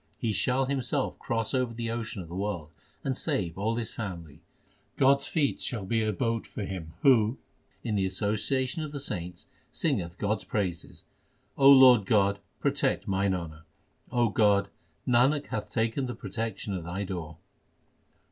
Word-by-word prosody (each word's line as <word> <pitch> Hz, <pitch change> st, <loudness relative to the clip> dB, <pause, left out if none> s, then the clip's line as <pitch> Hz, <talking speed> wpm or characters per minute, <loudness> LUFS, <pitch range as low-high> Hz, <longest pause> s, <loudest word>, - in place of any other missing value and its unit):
He 110 Hz, -2 st, -1 dB
shall 130 Hz, +4 st, +1 dB
himself 135 Hz, +1 st, -1 dB
cross 115 Hz, -1 st, -2 dB
over 125 Hz, -3 st, 0 dB
the 115 Hz, -1 st, -3 dB
ocean 110 Hz, -4 st, -4 dB
of -, -, -12 dB
the 85 Hz, -, -10 dB
world, 95 Hz, -6 st, -3 dB, 0.3 s
And 135 Hz, -1 st, -1 dB
save 85 Hz, -8 st, -1 dB
all 110 Hz, +4 st, -1 dB
his 115 Hz, -1 st, -4 dB
family. 85 Hz, -8 st, -6 dB, 0.6 s
God 135 Hz, +1 st, +5 dB
s 140 Hz, -, -8 dB
feet 150 Hz, -5 st, 0 dB
shall 115 Hz, -7 st, -3 dB
be 115 Hz, +3 st, +1 dB
a 110 Hz, -, +1 dB
boat 115 Hz, +2 st, -1 dB
for 105 Hz, -, -5 dB
him 85 Hz, -5 st, -6 dB
Who 120 Hz, -2 st, +5 dB, 0.5 s
in 115 Hz, -, -2 dB
the 95 Hz, -2 st, +1 dB
association 115 Hz, -, -1 dB
of 150 Hz, -1 st, -6 dB
the 140 Hz, -, -4 dB
saints 90 Hz, -8 st, -5 dB, 0.2 s
singeth 95 Hz, -, -1 dB
God 105 Hz, +1 st, 0 dB
s -, -, -11 dB
praises. 90 Hz, -5 st, -3 dB, 0.5 s
O 135 Hz, 0 st, +7 dB
Lord 130 Hz, -6 st, +8 dB
God, 100 Hz, -2 st, +3 dB, 0.2 s
protect -, -, 0 dB
mine 95 Hz, 0 st, +1 dB
honour. 80 Hz, -3 st, -7 dB, 0.5 s
O 120 Hz, -2 st, +3 dB
God, 100 Hz, -2 st, +3 dB, 0.4 s
Nanak 130 Hz, +4 st, +3 dB
hath 105 Hz, -1 st, -3 dB
taken 115 Hz, +4 st, 0 dB
the 125 Hz, -, -4 dB
protection 110 Hz, -2 st, -4 dB
of 90 Hz, -3 st, -3 dB
Thy 90 Hz, +4 st, -3 dB
door. 85 Hz, -5 st, -5 dB
110 Hz, 165 wpm, -28 LUFS, 95-125 Hz, 0.6 s, Lord